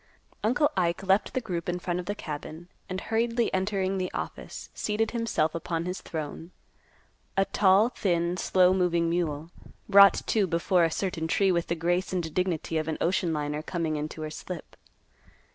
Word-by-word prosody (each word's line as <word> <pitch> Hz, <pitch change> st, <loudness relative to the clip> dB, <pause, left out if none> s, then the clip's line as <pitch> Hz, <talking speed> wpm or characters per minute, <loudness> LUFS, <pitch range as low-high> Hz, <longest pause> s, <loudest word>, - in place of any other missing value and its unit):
Uncle 250 Hz, +7 st, +3 dB
Ike 175 Hz, 0 st, 0 dB
left 195 Hz, +2 st, +2 dB
the 255 Hz, -, +1 dB
group 175 Hz, -6 st, -4 dB
in 175 Hz, -, -1 dB
front 180 Hz, 0 st, -2 dB
of 180 Hz, -, -6 dB
the 205 Hz, -, -2 dB
cabin, 155 Hz, +1 st, -7 dB, 0.2 s
and, 185 Hz, 0 st, -3 dB
hurriedly 230 Hz, +2 st, 0 dB
entering 190 Hz, 0 st, 0 dB
the 185 Hz, -1 st, -1 dB
office, -, -, -6 dB
seated 215 Hz, +1 st, -1 dB
himself 230 Hz, -10 st, 0 dB
upon 165 Hz, 0 st, -3 dB
his 180 Hz, +1 st, -4 dB
throne. 160 Hz, +1 st, -6 dB, 0.9 s
A 195 Hz, -, +4 dB
tall, 200 Hz, +3 st, +4 dB
thin, 175 Hz, -6 st, 0 dB
slow 185 Hz, 0 st, +4 dB
moving 170 Hz, -3 st, +1 dB
mule, 165 Hz, -2 st, -2 dB, 0.4 s
brought 200 Hz, -1 st, +7 dB
to 210 Hz, -4 st, +2 dB
before 170 Hz, +1 st, +2 dB
a -, -, +1 dB
certain 165 Hz, -2 st, -2 dB
tree 195 Hz, +3 st, +3 dB
with 170 Hz, -1 st, 0 dB
the 170 Hz, -, 0 dB
grace 175 Hz, +3 st, 0 dB
and 170 Hz, -4 st, -2 dB
dignity 170 Hz, -3 st, 0 dB
of 155 Hz, -, -3 dB
an 160 Hz, -, -2 dB
ocean 175 Hz, 0 st, +1 dB
liner 150 Hz, -1 st, -2 dB
coming 160 Hz, -1 st, -2 dB
into 155 Hz, +1 st, -4 dB
her 155 Hz, -, -5 dB
slip. 170 Hz, +1 st, -8 dB
180 Hz, 175 wpm, -27 LUFS, 165-195 Hz, 0.9 s, brought